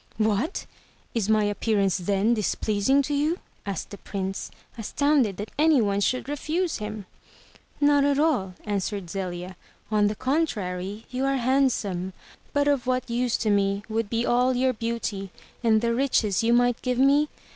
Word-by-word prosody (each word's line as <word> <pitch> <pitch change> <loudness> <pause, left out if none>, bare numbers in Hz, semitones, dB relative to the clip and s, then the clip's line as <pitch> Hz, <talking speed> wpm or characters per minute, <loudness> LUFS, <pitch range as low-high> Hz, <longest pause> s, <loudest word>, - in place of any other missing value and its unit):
"What! 215 - 0 0.5
Is 220 -3 -1
my 215 -1 +4
appearance 205 -2 +1
then 200 +5 +2
displeasing 215 +5 +1
to 290 - -3
you?" 300 +4 +1 0.3
asked 195 -5 -4
the 200 - -8
Prince, 195 -1 -4 0.3
astoimded 255 -1 +1
that 205 0 -6
any 310 -2 +5
one 200 -2 +1
should 255 +5 0
refuse 310 +4 -1
him. 210 -1 -6 0.7
"Not 290 -1 +4
at 285 -1 +2
all," 255 - +1
answered 200 -3 -2
Zelia. 185 -1 -4 0.4
"On 210 -1 +3
the 210 - -1
contrary, 210 - -2
you 255 +1 -2
are 275 0 +1
handsome. 235 -8 +1 0.4
But 285 0 +1
of 280 -4 +1
what 255 -1 0
use 240 0 +1
to 215 - +3
me 200 0 +1
would 220 -1 -1
be 230 +2 0
all 250 +1 +3
your 255 +1 +2
beauty, 230 -4 -3 0.3
and 220 -2 +4
the 235 0 +1
riches 230 -6 +1
you 230 +1 +2
might 245 0 +3
give 250 -1 -1
me? 280 +3 +4
230 Hz, 160 wpm, -25 LUFS, 200-265 Hz, 0.7 s, any